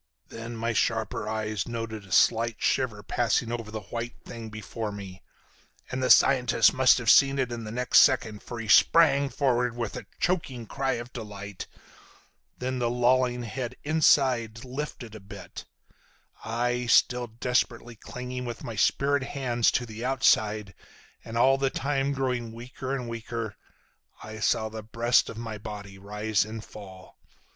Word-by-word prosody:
"Then 115 +1 -7
my 115 +1 -1
sharper 110 -1 -1
eyes 110 -1 -2
noted 115 -3 -5
a - - -17
slight 115 0 +3
shiver 115 -6 0
passing 115 +1 0
over 115 -2 -4
the 110 0 -5
white 120 +1 -4
thing 115 -1 -8
before 110 +1 -5
me, 95 -2 -9 0.7
and 130 +1 -2
the 130 - 0
scientist 125 -4 +5
must 130 -1 +5
have 120 - -5
seen 135 +7 +6
it 130 -3 -1
in 115 -1 -5
the 105 - -6
next 125 +2 +4
second, 110 -3 +3
for 120 - -7
he 115 - -5
sprang 140 +4 +5
forward 125 -4 0
with 115 -3 -3
a - - -7
choking 135 -10 -1
cry 135 +4 -1
of 120 +1 -6
delight. 105 -4 -7 0.9
Then 130 0 -3
the 120 -1 +1
lolling 125 0 +2
head 125 +2 -5
inside 130 -7 +2
lifted 130 -3 -6
a 110 - -8
bit. 100 -1 -10 0.8
I—still 120 +1 +2
desperately 120 0 -1
clinging 125 +3 -6
with 120 -1 -6
my 115 - -6
spirit 140 +6 +2
hands 130 -3 0
to 125 - 0
the 110 0 -8
outside, 110 -6 +2 0.5
and 115 0 -6
all 135 +3 +4
the 135 0 +2
time 140 0 -1
growing 125 -4 -2
weaker 130 +3 -5
and 125 -3 -5
weaker—I 115 -1 -9
saw 110 +1 +1
the 110 0 -7
breast 115 +3 +2
of - - -8
my 115 -2 -6
body 100 -2 -8
rise 105 +1 0
and 110 +1 -8
fall. 95 -3 -13
115 Hz, 155 wpm, -27 LUFS, 110-125 Hz, 0.9 s, seen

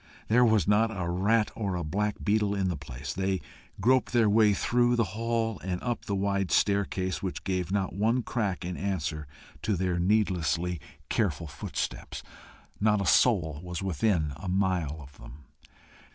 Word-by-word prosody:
There 120 +3 +5
was 110 -4 +3
not 105 +2 +4
a 95 -6 -3
rat 105 +6 +2
or 100 -4 -2
a 85 - -2
black 105 +7 -1
beetle 105 -1 +2
in 95 -2 0
the 90 - -1
place. 70 0 -7
They 95 0 0 0.4
groped 130 +6 +2
their 115 -3 +4
way 105 -1 +5
through 120 +3 +2
the 115 - +3
hall, 115 -1 -1
and 90 -1 -3
up 120 -2 -2
the 100 - -1
wide 100 -1 0
staircase, 100 -2 +1
which 95 -2 -4
gave 90 -2 -2
not 95 -2 0
one 115 +6 +1
crack 100 -8 -2
in 90 0 -4
answer 80 -6 -3 0.3
to 105 - 0
their 90 -1 0
needlessly 90 -4 +1 0.3
careful 95 -7 0
footsteps: 75 - -5 0.6
not 105 0 +3
a 100 - -1
soul 85 - +3
was 90 0 -5
within 85 -4 +1
a 95 - -8
mile 90 -5 0
of 70 0 -14
them. 70 +4 -12
95 Hz, 165 wpm, -28 LUFS, 90-110 Hz, 0.6 s, There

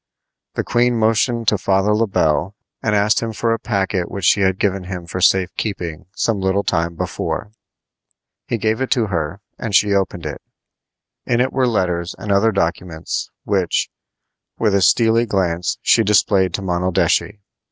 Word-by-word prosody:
The - - -1
queen 120 0 +1
motioned 115 +1 +1
to 105 - 0
Father 95 +2 +2
Le 115 +1 +1
Bel 90 +1 0 0.3
and 105 -1 0
asked 105 +1 +3
him 115 -1 -3
for 115 +1 0
a 115 - -2
packet 95 -5 -1
which 100 -3 -4
she 100 - +4
had 95 -1 +2
given 95 -2 -1
him 90 -2 -6
for 90 +2 -5
safe 95 -1 +3
keeping 85 -7 -4
some 110 -4 0
little 95 +1 +1
time 85 -2 -1
before. 100 - -4 1.0
He 120 - -1
gave 110 +2 -1
it 130 - -1
to 120 -4 +1
her, 85 +4 -2 0.2
and 110 -4 -2
she 105 +1 +4
opened 95 -4 -1
it. 75 -2 -5 0.9
In 120 - +1
it 130 +1 +1
were 130 -1 +2
letters 90 -5 -1
and 105 - -4
other 100 +3 +3
documents, 85 -3 -2
which, 95 -4 0 0.7
with 110 -3 +1
a 100 - +3
steely 115 +4 +3
glance, 90 -4 -1
she 115 - +4
displayed 95 -3 +2
to 100 - -4
Monaldeschi. 90 +3 0
100 Hz, 170 wpm, -19 LUFS, 90-110 Hz, 1.0 s, she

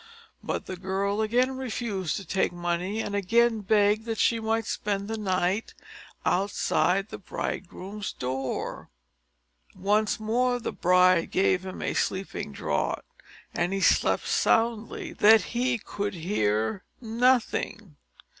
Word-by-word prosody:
But - - -3
the 185 - -6
girl 195 +3 -1
again 250 +4 +1
refused 220 -9 -3
to 195 - -6
take 190 +2 0
money 175 +4 -2
and 200 - -5
again 225 +3 +3
begged 210 +1 +3
that 225 -1 -3
she 230 +1 +2
might 225 0 0
spend 200 -1 -2
the 225 - -3
night 190 0 -1 0.5
outside 195 0 +1
the - - -7
bridegroom's 195 +2 -5
door. 130 +1 -4 0.9
Once 205 +3 +1
more, 245 +3 +1
the - - -3
bride 180 -1 +4
gave 185 -1 +2
him 190 -1 -6
a - - -1
sleeping 190 - -2
draught, - - -2 0.5
and 175 +2 0
he 195 - 0
slept - - +3
so - - -4 0.2
soundly, 230 -1 0
that 220 -1 +6
he 245 0 +1
could 205 -1 -4
hear 110 - 0 0.2
nothing. 230 - 0
205 Hz, 130 wpm, -27 LUFS, 185-225 Hz, 0.9 s, that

